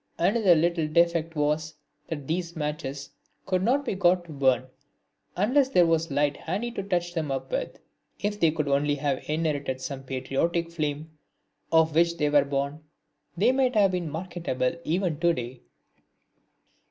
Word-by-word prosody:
Another 190 0 +4
little 165 0 +1
defect 170 0 +2
was 150 +1 0 0.3
that 145 -4 -5
these 170 +1 -2
matches 145 -3 -4 0.3
could 185 -1 0
not 265 +8 +1
be 240 - -1
got 180 -2 +2
to 165 - -11
burn 130 -3 +2 0.7
unless 255 +8 +3
there 180 -10 +5
was 165 0 +1
a 140 - -5
light 145 0 +2
handy 235 +5 -3
to 215 - -4
touch 175 -3 -1
them 160 -4 -2
up 135 - -4
with. - - -3 0.4
If 205 0 -2
they 165 - +5
could 150 -2 -2
only 145 +1 +2
have 140 -2 -2
inherited 150 -4 -1
some 130 +1 -5
of 135 - -16
the 130 -1 -3
patriotic 170 +6 -1
flame 155 -1 -4 0.5
of 160 -1 +4
which 170 +1 +3
they 150 -2 +1
were 145 -1 +5
born 140 +2 -3 0.5
they 220 +8 +4
might 260 -2 +1
have 200 -3 +4
been 180 -3 -2
marketable 160 -6 -2
even 170 -2 -1
to 170 0 +3
day. 120 -2 -6
160 Hz, 170 wpm, -26 LUFS, 145-180 Hz, 0.7 s, there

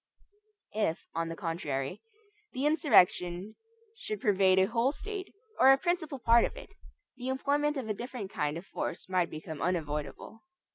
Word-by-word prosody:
If, 210 -6 -1
on 165 0 -2
the 165 - -5
contrary, 165 -3 -3 0.5
the 265 +2 -1
insurrection 200 - +3 0.4
should 215 - -5
pervade 190 -2 +4
a 190 - +6
whole 230 +5 +1
State, 400 +4 -6 0.3
or 265 - +8
a 270 - +6
principal 335 -3 -1
part 235 -1 +5
of - - -2
it, - - -10 0.5
the 250 - -6
employment 285 +3 +1
of 255 -5 -4
a 215 - 0
different 235 -3 -6
kind 150 +1 -1
of 170 - -8
force - - -5
might 185 -2 +1
become 155 -1 -7
unavoidable. 150 +2 -3
205 Hz, 155 wpm, -30 LUFS, 170-265 Hz, 0.5 s, or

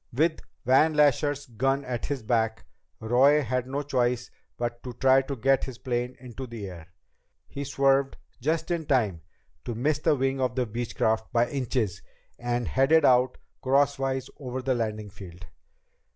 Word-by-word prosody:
With 155 +6 +1 0.2
Van 150 +5 +4
Lasher's 145 0 +2
gun 135 +4 -1
at 125 -2 -3
his 135 -4 -3
back, 110 -1 0 0.3
Roy 135 +6 +4
had 125 +1 -2
no 140 +2 -3
choice 125 -3 0 0.3
but 120 0 -3
to 125 - -7
try 130 +2 +4
to 140 +1 -5
get 135 +2 +2
his 130 -3 -8
plane 125 -1 -3
into 125 +1 -8
the 115 -4 -7
air. 85 -3 -10 0.6
He 140 - -6
swerved 135 0 +2 0.2
just 160 +5 -1
in 165 -3 -2
time 105 - +1 0.4
to 120 - -4
miss 145 +6 0
the 150 - +2
wing 135 0 0
of 125 -1 0
the 130 -1 +1
Beechcraft 110 -1 -1
by 120 0 +2
inches 125 -7 -2 0.4
and 120 0 -1
headed 145 +4 +4
out 125 0 +4 0.2
crosswise 135 -1 +1
over 130 -2 -5
the 130 0 +1
landing 110 -3 -3
field. 90 -3 -11
130 Hz, 160 wpm, -27 LUFS, 120-135 Hz, 0.6 s, Van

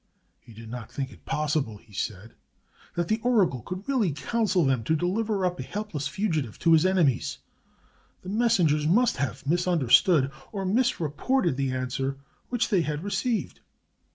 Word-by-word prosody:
He 115 - -17
did 110 +1 -10
not 120 -2 -7
think 135 -1 -4
it - - -17
pos 150 -1 -1
sible, 110 -9 -1
he 105 - -21
said, 105 +3 -4 0.6
that 175 -1 -1
the 220 +4 +1
oracle 205 - +2
could 185 - -7
really 245 - +2
counsel 190 - 0
them 130 -4 +1
to 160 - +2
deliver 195 +4 0
up 180 -1 -1
a - - -2
helpless 165 -2 -4
fugitive 160 - -2
to 165 - +3
his 160 +3 +5
enemies. 170 -10 +1 0.9
The 185 - -7
mes 230 +3 +3
sengers 150 -4 +2
must 235 +9 +3
have 130 -2 -3
misunderstood 165 -2 +3 0.2
or 195 -3 -3
misreported 185 - +1
the 135 0 -1
answer 130 +1 -2 0.3
which 245 -2 0
they 195 -6 +3
had 150 0 -3
received. 225 +3 -2
165 Hz, 165 wpm, -26 LUFS, 135-205 Hz, 0.9 s, his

